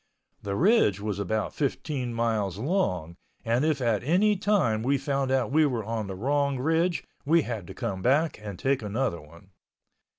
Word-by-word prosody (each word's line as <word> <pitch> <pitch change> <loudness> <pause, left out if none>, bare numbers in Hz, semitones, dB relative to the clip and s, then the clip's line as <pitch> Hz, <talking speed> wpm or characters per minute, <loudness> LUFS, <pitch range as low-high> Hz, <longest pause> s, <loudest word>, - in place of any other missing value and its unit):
The 100 -1 -3
ridge 170 - +3
was 105 -1 -3
about 105 +2 -2
15 140 -3 -2
miles 110 -5 -1
long 95 - -1 0.3
and 115 +4 +1
if 155 -3 +1
at 115 -4 +1
any 190 +9 +3
time 180 - +1
we 135 +4 +2
found 135 0 -1
out 130 -1 +1
we 155 +2 +4
were 120 -5 -2
on 110 -1 -3
the 95 - -5
wrong 140 +5 0
ridge 165 +6 +1 0.2
we 160 +2 +3
had 110 -7 -5
to - - -9
come 95 -1 -3
back 145 - +2
and 100 -3 -7
take 135 +6 0
another 110 -2 -2
one. 85 +6 -17
125 Hz, 175 wpm, -27 LUFS, 105-145 Hz, 0.3 s, we